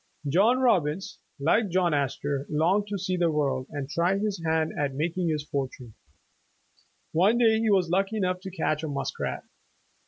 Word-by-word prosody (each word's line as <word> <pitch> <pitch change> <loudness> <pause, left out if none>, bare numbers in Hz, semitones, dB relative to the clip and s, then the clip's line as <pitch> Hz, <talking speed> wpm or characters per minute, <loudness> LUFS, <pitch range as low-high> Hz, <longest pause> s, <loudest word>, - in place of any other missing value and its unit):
John 200 - +4
Robbins, 190 - +1 0.2
like 195 +9 +2
John 175 -2 +2
Astor, 140 0 -1
longed 175 +7 +1
to 205 0 -3
see 185 -1 -2
the 170 -1 +2
world, 140 -4 -1
and 145 -3 -5
try 170 +6 +1
his 205 -3 -2
hand 160 -1 +1
at 140 -2 -2
making 170 +4 -1
his 155 -2 -1
fortune. 130 -5 -4 1.2
One 195 +8 +3
day 225 -2 +4
he 225 -1 +1
was 185 -4 +2
lucky 195 +4 +1
enough 185 -2 0
to 190 +1 -7
catch 160 -4 -1
a 160 - -3
muskrat. 140 -2 -3
170 Hz, 165 wpm, -27 LUFS, 145-195 Hz, 1.2 s, John